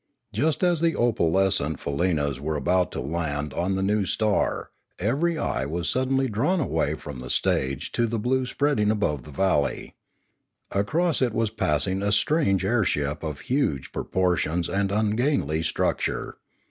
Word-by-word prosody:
Just 155 +3 0
as 175 -3 +2
the 165 -1 +2
opalescent 95 - +1
faleenas 70 -3 0
were 75 +3 -2
about 90 +4 +1
to - - -3
land 75 0 -2
on 90 +3 0
the 95 - -1
new 100 0 +1
star, 110 -2 0 0.3
every 150 - 0
eye 65 - -1
was 85 +2 -3
suddenly 130 +1 +1
drawn 130 - +1
away 145 - 0
from 70 -3 -8
the 65 0 -7
stage 65 +2 0
to 120 - +1
the 115 +1 -2
blue 125 +4 0
spreading 140 -7 +1
above 75 - 0
the 75 - -10
valley. 75 -2 0 0.8
Across 155 - +1
it 120 -4 +1
was 115 -2 +1
passing 95 -1 0
a 100 0 0
strange 105 - +2
airship 80 -10 0
of 75 -2 -5
huge 85 - -1
proportions 90 -2 0
and 100 0 0
ungainly 105 - +1
structure. 80 - -1
95 Hz, 150 wpm, -25 LUFS, 75-120 Hz, 0.8 s, as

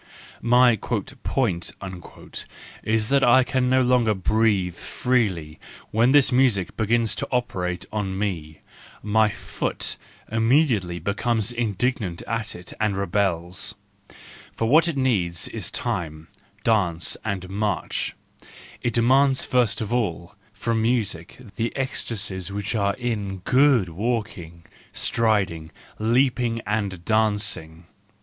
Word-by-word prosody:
My 125 -1 +5
"point" 120 -4 -2 1.1
is 110 0 0
that 140 0 +3
I 130 +2 +6
can 125 0 0
no 130 0 +4
longer 120 -4 +3
breathe 100 -2 +1
freely 95 -9 -1 0.3
when 115 +4 +4
this 140 -1 +5
music 125 -8 +2
begins 115 0 +1
to - - -3
operate 90 -8 -1
on 100 -3 -2
me; 85 -7 -3 0.4
my 110 +1 +3
joot - - -4 0.3
immediately 115 - +2
becomes 105 +5 -1
indignant 115 -5 -1
at 115 -1 -3
it 90 0 -9
and 105 -3 +1
rebels: 95 -2 -1 0.8
for 115 - 0
what 160 +7 +5
it 165 -4 -2
needs 95 -11 +1
is - - -5
time, 80 -2 -3 0.3
dance 90 -7 +1
and 100 -4 -3
march; 100 +2 -2 0.7
it 120 - -1
demands 130 +3 +4
first 115 -4 +1
of 110 +1 -3
all 90 -8 -1 0.2
from 115 -1 -1
music 110 -8 -1 0.2
the 115 0 0
ecstasies 105 -8 -3
which 100 -1 -3
are 100 -2 +1
in 105 -6 -3
good 130 -6 +4
walking, 90 -3 -4 0.3
striding, 100 -8 0 0.3
leap¬ 120 +4 +2
ing 115 -2 0
and 100 -5 -2
dancing. 105 -7 0
110 Hz, 115 wpm, -24 LUFS, 95-120 Hz, 1.1 s, I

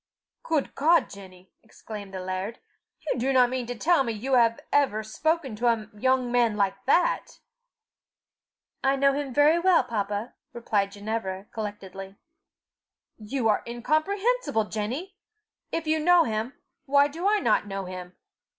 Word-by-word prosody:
"Good 315 -4 -1
God, 330 +4 +3
Jenny!" 185 -2 -13
exclaimed 210 -3 -10
the 190 -1 -5
laird, 185 +4 -4 0.5
"you 290 - -1
do 260 +3 +1
not 250 -2 +4
mean 255 -2 -3
to 245 - -4
tell 320 +4 +3
me 235 - -2
you 250 +6 -3
have 230 -2 +4
ever 260 -7 +2
spoken 285 +3 -1
to 240 +2 0
a 225 -2 +1
young 255 +2 +1
man 235 -3 +2
like 195 -1 0
that?" 360 - +2 1.5
"I 270 +1 +3
know 275 0 +3
him 280 -1 -3
very 295 +6 +4
well, 355 -4 +4
papa," 210 -1 -3 0.2
replied 205 -4 -1
Ginevra, 205 -2 -4
collectedly. 195 -3 -7 1.0
"You 225 +3 -2
are 210 - +2
incomprehensible, 310 - 0
Jenny! 265 - -4 0.5
If 330 - -2
you 315 0 +1
know 345 +2 +5
him, 220 +2 -3 0.3
why 280 +1 +5
do 330 +6 -3
I 425 - +3
not 225 - +1
know 195 -1 -4
him? 180 0 -8
235 Hz, 150 wpm, -26 LUFS, 210-290 Hz, 1.5 s, know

